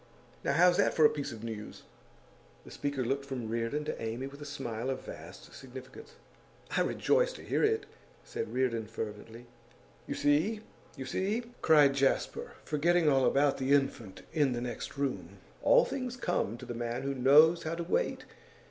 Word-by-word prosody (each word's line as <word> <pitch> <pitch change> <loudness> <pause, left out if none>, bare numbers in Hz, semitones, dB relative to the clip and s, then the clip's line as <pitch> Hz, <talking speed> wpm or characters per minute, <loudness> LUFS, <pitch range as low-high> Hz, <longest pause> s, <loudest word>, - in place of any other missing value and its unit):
Now, 140 - +1
how's 175 +4 +5
that 200 - +2
for 155 - +6
a - - +6
piece 145 -2 -4
of 115 -1 -9
news?' 110 -2 -7 0.8
The - - -12
speaker 140 -3 -2
looked 135 +3 -1
from 130 -4 -5
Reardon 115 +6 -2
to - - -4
Amy 115 +3 -3
with 140 +2 -10
a - - -6
smile 130 -4 -4
of 130 -1 -4
vast - - -10
significance. 135 - -11 0.6
'I - - +3
rejoice - - +2
to - - -11
hear - - 0
it!' 435 -1 +2 0.4
said 455 - -5
Reardon, 115 -4 0
fervently. 110 +1 -7 0.6
'You - - -3
see! 160 +10 +2 0.4
you 130 - -5
see!' 200 - -1 0.2
cried 150 -3 +6
Jasper, 135 0 0
forgetting 160 +2 +2
all 135 -2 +3
about 140 0 +2
the 135 +1 +2
infant 120 -8 0
in 145 -5 +2
the 120 - -3
next 125 +3 -5
room, 100 -10 -3 0.2
'all - - +5
things 255 -2 -4
come 175 - -1
to 125 - -10
the 120 - -5
man 120 +1 -3
who 140 0 -1
knows 150 +6 +6
how 160 +1 -3
to 170 - -3
wait. - - -1
140 Hz, 175 wpm, -31 LUFS, 120-160 Hz, 0.8 s, for